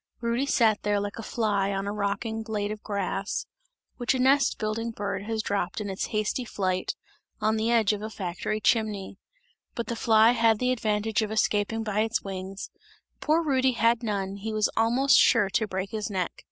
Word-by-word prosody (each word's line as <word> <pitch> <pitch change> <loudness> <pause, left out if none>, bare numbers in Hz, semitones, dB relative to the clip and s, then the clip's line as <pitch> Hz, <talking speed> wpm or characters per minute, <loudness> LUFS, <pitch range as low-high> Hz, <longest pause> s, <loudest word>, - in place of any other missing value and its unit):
Rudy 235 +3 -1
sat 225 -6 +3
there 205 0 +1
like 205 +2 -5
a - - -3
fly 205 -3 0
on 195 0 -2
a 200 - -2
rocking 210 +2 -2
blade 210 -2 -3
of 215 0 -6
grass, 200 -1 -2 0.5
which 245 +1 +1
a - - -1
nest 275 +2 +3
building 220 +2 -2
bird 205 -3 -4
has 220 0 -2
dropped 200 -2 -2
in 205 -2 -3
its 190 - -3
hasty 215 +3 -1
flight, 185 -5 -2 0.4
on 215 +1 +1
the 220 +1 0
edge 225 -3 +3
of 205 - -4
a 215 - -4
factory 195 +1 -3
chimney; 210 -2 0 0.6
but 235 - -2
the 235 - -3
fly 225 0 +5
had 230 -2 +3
the 250 +3 +1
advantage 220 -2 0
of 215 -1 -2
escaping 220 0 +1
by 210 -1 -1
its 220 +1 0
wings, 195 0 -6 0.5
poor 315 +2 +2
Rudy 265 -4 +2
had 230 0 +2
none, 200 -3 -2
he 220 +2 -5
was 215 -1 +1
almost 240 +5 +4
sure 195 -2 +4
to 220 - +1
break 190 0 -4
his 215 -1 -3
neck. 185 -3 -1
215 Hz, 195 wpm, -27 LUFS, 200-230 Hz, 0.6 s, fly